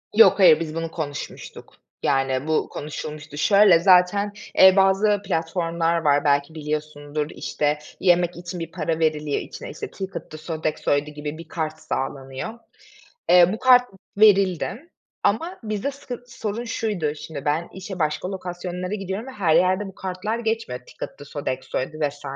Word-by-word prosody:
Yok 210 -3 +7
hayır, 165 -4 +7
biz 160 -1 -4
bunu 165 0 -3
konuşmuştuk. 145 -4 -7 0.3
Yani 135 +1 +1
bu 160 - +1
konuşulmuştu. 150 0 -7
Şöyle, 200 -1 +6
zaten, 185 +3 +4 0.3
eee, 190 0 +9
bazı 195 +2 +3
platformlar 165 -1 0
var, 145 -3 +2
belki 145 +2 +2
biliyorsundur. 150 -1 -3
İşte, 150 0 -1 0.2
yemek 175 -1 +3
için 175 0 -6
bir 165 - -6
para 165 -1 -2
veriliyor, 150 -2 0
içine, - - -9
işte, 425 - -7
Ticket'dı, 190 -5 -7
Sodexo'ydu 155 -2 -1
gibi 150 +1 -6
bir 165 -1 -10
kart 155 -2 -3
sağlanıyor. 135 +5 -4 0.8
Eee, 175 0 +7
bu 220 - -5
kart 250 -1 +7 0.3
verildi 200 - +3 0.3
ama 330 - 0
bizde 215 +5 -2
sıkın 250 -3 -8
sorun 230 -1 -4
şuydu: 205 -10 -2
Şimdi 150 -2 -8
ben 155 +4 0
işe 190 -1 -7
başka 155 +5 -1
lokasyonlara 180 0 -5
gidiyorum 195 +4 -5
ve - - -7
her 175 -9 +2
yerde 185 +3 +3
bu 190 - -11
kartlar 190 +5 -3
geçmiyor, 225 - -2
Ticket'dı, 145 +3 -9
Sodexo'ydu 140 +1 -4
vs. 145 0 -11
170 Hz, 145 wpm, -23 LUFS, 150-200 Hz, 0.8 s, eee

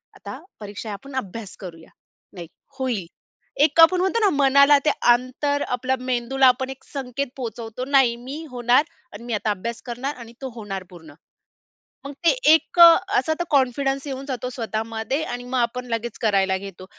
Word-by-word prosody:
आता - - -9 0.2
परीक्षा 210 +1 -7
आहे, - - -4
आपण 265 +7 -10
अभ्यास 220 -3 -6
करूया. 165 -4 -10 0.4
नाही, 175 -3 -9 0.3
होईल. 245 -9 -2 0.6
"एक 310 +2 +2
आपण 360 +2 +6
म्हणतो 380 +5 +1
ना 420 -3 +4
मनाला, 280 +1 +6
ते - - +5 0.2
अंतर 270 +4 -2
आपल्या 255 +1 -1
मेंदूला 255 +1 +1
आपण 260 +1 +2
एक 265 0 -9
संकेत 275 0 -3
पोहोचवतो, 230 0 -6
"नाही, 265 -4 +3
मी 270 +7 -8
होणार 245 +3 +3 0.3
आणि 220 +3 -10
मी 240 -1 -5
आता 210 +1 -1
अभ्यास 225 +4 -5
करणार 255 +4 -4
आणि 235 -1 -12
तो 265 - -4
होणार 195 -4 -6
पूर्ण." 160 -5 -14 0.9
मग 280 - -7
ते 335 - +7 0.2
एक 320 +2 +2
अ, 335 -1 +10 0.2
असा 315 - +1
तर - - +1
कॉन्फिडन्स 270 0 +1
येऊन 270 0 -5
जातो 250 -2 -4
स्वतःमध्ये 225 +3 -3
आणि 245 -3 -5
मग 255 +1 -3
आपण 250 +1 -1
लगेच 230 0 -3
करायला 195 -3 +2
घेतो. 190 -1 -10
250 Hz, 175 wpm, -22 LUFS, 225-275 Hz, 0.9 s, अ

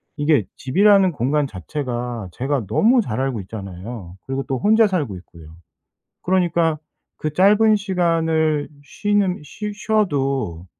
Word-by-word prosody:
이게 145 -9 +2
집이라는 195 +6 +4
공간 145 +1 0
자체가 120 - -5
제가 135 +2 -2
너무 235 - +3
잘 120 - -3
알고 135 -4 -1
있잖아요. 95 -1 -8
그리고 135 0 -3
또 135 -2 -1
혼자 220 - +4
살고 150 - -2
있고요. 80 -3 -15 0.7
그러니까 170 -4 +1 0.4
그 155 - -3
짧은 210 +5 +5
시간을 165 -6 0 0.2
쉬는 200 +3 0
쉬 210 +8 -6
쉬어도 140 - -1
150 Hz, 270 characters per minute, -21 LUFS, 120-190 Hz, 0.7 s, 짧은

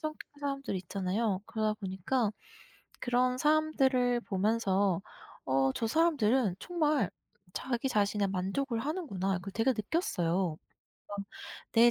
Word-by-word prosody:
성격의 305 -2 -7
사람들이 275 -8 -2
있잖아요. 190 +2 -1
그러다 215 -1 0
보니까 200 +4 0 0.7
그런 250 +1 +2
사람들을 265 -5 +3
보면서 195 -3 +1 0.4
'어 135 0 +2
저 225 - -1
사람들은 255 - +3
정말 305 - +1 0.4
자기 255 0 -1
자신에 205 -3 +2
만족을 195 +7 -1
하는구나.' 210 - -1
그 195 - -6
되게 225 +6 +2
느꼈어요. 190 - 0 0.5
막 205 - -5 0.6
내 235 +1 +7
225 Hz, 275 characters per minute, -31 LUFS, 195-270 Hz, 0.7 s, 내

